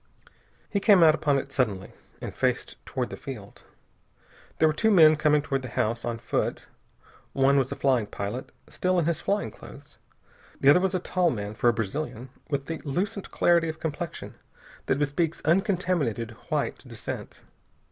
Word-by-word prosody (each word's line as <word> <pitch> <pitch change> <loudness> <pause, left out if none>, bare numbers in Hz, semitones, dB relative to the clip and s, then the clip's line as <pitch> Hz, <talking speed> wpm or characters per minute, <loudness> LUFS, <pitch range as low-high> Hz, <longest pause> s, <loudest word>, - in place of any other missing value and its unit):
He 200 - -1
came 200 -3 +6
out 155 -1 +7
upon 145 -2 +1
it 140 - -4
suddenly, 105 -9 -1 0.3
and - - -6
faced - - -1
toward 125 -2 -3
the - - -6
field. 130 -8 -9 0.9
There 160 - +5
were 155 - +2
two 220 +9 +2
men 160 -6 +7
coming 150 -1 +3
toward 135 -3 -1
the 130 - -7
house, 115 0 -1
on 120 -1 -2
foot. - - -2 0.7
One 135 +1 +4
was 130 -1 -1
a - - -2
flying 130 -6 +1
pilot, 100 +6 -5 0.2
still 185 0 0
in 170 - +2
his 165 -1 0
flying 200 +1 -1
clothes. 145 0 -13 0.6
The 135 - +5
other 180 - +6
was 190 0 0
a - - +1
tall 180 0 +1
man, 105 -6 -4
for 120 +2 +2
a - - +3
Brazilian, 120 +3 -4 0.2
with 140 -2 -2
the 165 +1 -4
lucent 190 +7 -2
clarity 170 -1 +3
of 160 - -6
complexion 160 +1 -5 0.5
that - - +2
bespeaks 150 +3 0
uncontaminated 170 - +1 0.2
white - - -1
descent. - - -7
145 Hz, 170 wpm, -26 LUFS, 125-170 Hz, 0.9 s, out